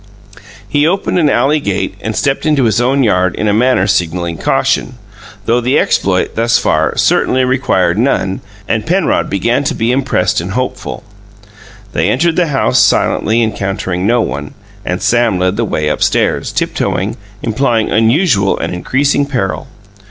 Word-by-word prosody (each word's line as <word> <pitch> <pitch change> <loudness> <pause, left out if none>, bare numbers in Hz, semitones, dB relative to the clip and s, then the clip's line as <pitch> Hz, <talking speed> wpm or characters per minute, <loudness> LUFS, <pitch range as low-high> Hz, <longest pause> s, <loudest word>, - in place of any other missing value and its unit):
He 145 +1 +1
opened 185 0 0
an 155 -4 +3
alley, 145 +2 +2
gate 95 -7 -2
and 110 0 -4
stepped 140 +2 -1
into 150 -3 +2
his 115 0 +2
own 135 +3 +2
yard 95 -5 +1
in 110 - -2
a 105 - +2
manner 120 -3 +2
signalling 85 -3 -1
caution 125 - 0 0.5
though 120 +2 +1
the 125 +3 +1
exploit, 95 -1 +1
thus 115 +1 +2
far, - - 0
certainly 130 0 +2
required 105 -8 +1
none 95 -6 0 0.3
and 115 +5 -2
Penrod 180 +1 +1
began 115 +7 0
to - - -1
be 115 +2 0
impressed 130 -10 0
and 95 +3 -5
hopeful. 130 +1 -4 0.9
They - - +1
entered 165 +5 +1
the 175 -2 +1
house, 135 -3 +1
silently, 115 +2 +2
encountering 95 -3 -2
no 120 +1 +3
one, 70 - -5 0.3
and 90 0 -3
Sam 120 -5 +2
led 90 +1 0
the 115 +2 -1
way 75 -7 -2
upstairs, - - 0
tiptoeing, - - -2 0.3
implying 115 -1 0
unusual 115 - +2
and - - -3
increasing 140 +9 0
peril. 95 -10 -3
115 Hz, 155 wpm, -14 LUFS, 95-135 Hz, 0.9 s, an